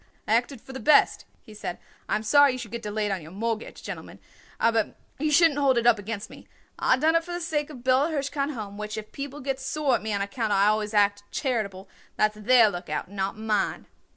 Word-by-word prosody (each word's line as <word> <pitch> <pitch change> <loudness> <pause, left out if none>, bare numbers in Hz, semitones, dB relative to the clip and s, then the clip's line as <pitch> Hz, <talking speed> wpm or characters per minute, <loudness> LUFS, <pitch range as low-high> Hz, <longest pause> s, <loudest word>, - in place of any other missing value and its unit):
"I 215 - +2
acted 245 +2 0
for 265 - -11
the 265 - -6
best," 295 0 +4 0.2
he 215 - -13
said. 205 -4 -5 0.3
"I - - +2
am 215 - -2
sorry 285 +5 +5
you - - -4
should 230 -4 -8
get 235 0 -5
delayed 210 -1 -2
on 190 -2 -2
your 155 - -11
mortgage, 225 +4 -4
gentlemen, - - -7 0.4
aber 225 -2 +1 0.2
you 305 +2 +1
shouldn't 300 -1 +4
hold 270 -3 +3
it 235 - +1
up 235 -3 +5
against 205 0 -5
me. - - -14 0.3
I 255 - +3
done 315 +4 +3
it 330 0 +3
for 350 +1 -7
the 350 - -2
sake 310 -3 -2
of 300 - -9
the 240 - -15
Bella 260 +4 +3
Hirshkind 285 -1 -2
Home, 205 -2 -7
which 210 +1 -5
if 215 0 -7
people 280 +1 -6
gets 270 0 -3
sore 280 0 0
at - - +1
me 220 +1 -3
on 200 - 0
account 215 +1 -2
I 200 +1 +4
always 215 0 -1
act 205 0 +3
charitable, 210 -8 -2 0.3
that's 215 0 +2
their 225 +1 +5
lookout, 175 -2 -5
not 195 +1 -3
mine." 215 -2 -1
230 Hz, 235 wpm, -26 LUFS, 210-275 Hz, 0.4 s, sorry